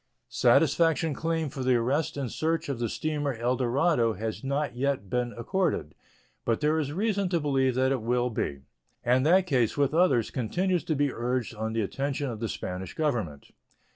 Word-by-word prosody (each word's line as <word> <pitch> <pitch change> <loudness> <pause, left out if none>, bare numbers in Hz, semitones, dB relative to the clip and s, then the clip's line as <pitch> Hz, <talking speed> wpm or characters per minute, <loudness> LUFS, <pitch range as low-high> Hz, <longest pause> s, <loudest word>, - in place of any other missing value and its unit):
Satisfaction 165 -2 +3
claimed 160 -1 -2
for 135 - -5
the 130 -1 +3
arrest 135 +7 0
and 135 -4 -3
search 160 -1 -1
of 135 -4 -3
the 120 -2 -1
steamer 145 -2 -2
El 120 +3 0
Dorado 125 -1 +2
has 110 +5 -5
not 140 -1 -1
yet 130 -6 -1
been 125 -1 0
accorded, 125 - -1 0.5
but 115 -1 0
there 155 +1 +2
is 145 -2 -2
reason 200 +2 0
to 175 -2 +1
believe 135 -4 +1
that 130 +1 +2
it 135 -3 0
will 125 +2 0
be; 70 -10 -3 0.4
and 125 +2 +3
that 185 +3 +5
case, 130 - +1
with 140 0 +2
others, 150 -10 +3
continues 175 - 0
to 155 - 0
be 145 -1 +1
urged 120 0 -2
on 110 0 -3
the 115 - 0
attention 135 +5 -2
of 110 - -6
the 115 -1 -2
Spanish 90 -1 -5
Government. 115 - -2
130 Hz, 185 wpm, -28 LUFS, 120-155 Hz, 0.5 s, that